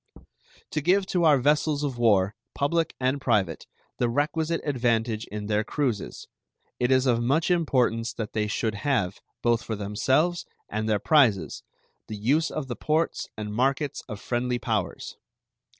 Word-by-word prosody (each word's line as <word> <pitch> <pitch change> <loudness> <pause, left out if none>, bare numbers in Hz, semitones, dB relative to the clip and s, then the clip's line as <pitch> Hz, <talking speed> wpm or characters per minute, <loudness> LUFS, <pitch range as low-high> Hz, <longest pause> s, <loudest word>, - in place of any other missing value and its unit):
To 150 - -1
give 190 +5 +3
to 175 -2 +3
our 150 -3 +6
vessels 150 +2 +1
of 135 -4 -3
war, 100 -4 +3 0.2
public 165 +3 0
and 130 +2 0
private, 100 -10 0 0.3
the 120 - +2
requisite 155 +5 0
advantage 115 -5 0
in 105 0 -6
their 105 0 +1
cruises, 125 -6 -3 0.5
it 125 - +1
is 130 0 +3
of 120 -3 +2
much 150 +9 +1
importance 125 -9 +1
that 110 -2 -5
they 105 -1 0
should 110 +1 -1
have, 100 -4 -1 0.2
both 120 -1 +2
for 115 - -4
themselves 130 - 0 0.2
and 110 +1 -2
their 105 - +3
prizes, 105 - +3 0.5
the 110 - -6
use 140 +10 +2
of 155 -3 -4
the 120 - -4
ports 155 +2 -1
and 105 -1 -5
markets 135 +5 0
of 105 -3 -6
friendly 120 +2 -1
powers. 110 -6 -3
120 Hz, 155 wpm, -26 LUFS, 110-145 Hz, 0.5 s, our